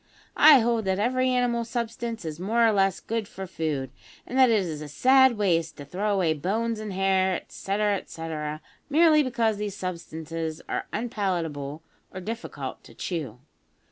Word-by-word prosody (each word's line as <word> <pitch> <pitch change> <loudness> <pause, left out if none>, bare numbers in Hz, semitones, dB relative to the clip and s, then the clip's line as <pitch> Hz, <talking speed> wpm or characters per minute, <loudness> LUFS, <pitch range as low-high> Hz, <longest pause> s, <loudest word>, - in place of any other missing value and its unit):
I 300 -4 +8
hold 230 -2 +1
that 190 0 +1
every 255 +4 +1
animal 245 -2 +1
substance 230 -2 -4
is 155 0 -5
more 225 +5 +2
or 225 - +5
less 195 -3 +2
good 225 -2 -3
for 190 -1 -7
food, 155 -6 -3 0.3
and 250 - -7
that 260 -1 +7
it 215 -4 +3
is 155 -3 -5
a 150 - -6
sad 260 - +5
waste 170 -6 +1
to 145 - -8
throw 195 +8 -2
away 185 -5 +2
bones 215 +9 -1
and 215 -1 -5
hair, 190 0 +2
etcetera, 205 +3 -1
etcetera, 155 -3 -5 0.3
merely 310 0 +5
because 230 -5 0
these 205 -1 -4
substances 165 -3 -5
are - - -3
unpalatable 170 -10 -3 0.3
or 185 - -6
difficult 225 +5 -6
to - - -15
chew. 140 - -4
195 Hz, 165 wpm, -26 LUFS, 165-230 Hz, 0.3 s, I